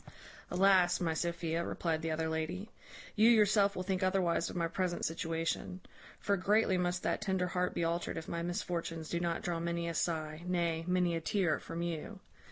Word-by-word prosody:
"Alas, 185 -1 +4
my 165 -2 0
Sophia," 170 0 -1
replied 165 -2 -1
the 165 - -2
other 160 0 -1
lady, 165 +7 -3 0.4
"you 220 +2 +6
yourself 205 -3 +4
will 185 - -3
think 185 0 -1
otherwise 185 -3 +1
of - - -8
my 170 -1 +1
present 180 0 -1
situation; 165 +2 -2 0.4
for 200 - +1
greatly 200 +1 +3
must 180 0 0
that - - 0
tender 190 -3 0
heart 180 0 -1
be - - 0
altered 170 +1 -1
if 160 - -6
my 170 - -3
misfortunes 170 -2 -3
do 170 - -1
not 170 -1 -1
draw 170 -1 -1
many 170 0 -2
a 170 - -2
sigh, 155 -1 -2
nay, 170 -2 0
many 180 -2 +2
a 165 - -2
tear, 175 -2 +1
from 165 +1 -5
you. 170 -3 -4
175 Hz, 185 wpm, -33 LUFS, 165-185 Hz, 0.4 s, you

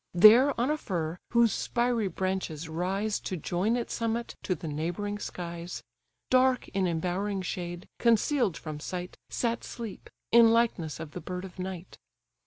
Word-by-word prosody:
There 230 +9 +8
on 250 +5 +2
a 305 - +1
fir, 170 - -3
whose 235 -2 +4
spiry 240 -3 0
branches 185 -3 -2
rise 190 +6 -1
To 185 - -4
join 180 +8 0
its 240 - -3
summit 230 0 -2
to 185 - -1
the 160 - -7
neighbouring 175 +7 -2
skies; 170 -2 -6 0.5
Dark 255 0 +4
in 190 -1 0
embowering 185 +4 -1
shade, 175 -1 -4
conceal'd 235 - +3
from 155 -2 -6
sight, 180 +3 -5
Sat 235 -1 -1
Sleep, 230 -4 -7 0.2
in 230 -1 +8
likeness 225 -10 +1
of 160 -2 -7
the 180 - -6
bird 180 +3 -5
of 185 -1 -11
night. 185 -1 -6
190 Hz, 155 wpm, -29 LUFS, 175-230 Hz, 0.5 s, There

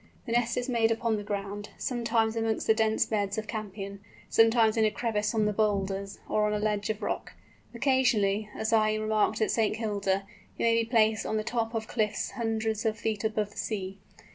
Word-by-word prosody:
The 235 - -5
nest 235 0 +1
is 245 +1 -1
made 230 -3 +2
upon 225 -1 0
the 205 - -5
ground, 205 0 -4
sometimes 230 -2 0
amongst 225 -1 -1
the 220 - +5
dense 220 0 +2
beds 205 -2 -1
of 215 - -2
campion, 200 -2 -6 0.3
sometimes 225 -1 +5
in 225 - +3
a 215 - +4
crevice 210 -1 -1
of 215 -1 +2
the 210 - +1
boulders, 195 -2 -1
or 210 0 +2
on 210 - 0
a - - +1
ledge 210 -1 -1
of 215 0 -3
rock. - - -3 0.4
Occasionally, 230 -6 +2
as 220 +1 -1
I 215 -1 +4
remarked 215 0 +1
at 215 - +2
St. 220 -1 +1
Kilda, 200 -3 -1 0.3
it - - -2
may 230 0 +4
be 230 - -5
placed 220 -2 +3
on 220 - 0
the 215 - -1
top 230 0 -2
of 220 -1 -2
cliffs 215 -3 -1
hundreds 220 -2 -1
of 220 -1 0
feet 220 -2 -2
above 215 -1 -1
the - - -17
sea. 195 -2 -4
215 Hz, 205 wpm, -28 LUFS, 210-225 Hz, 0.4 s, the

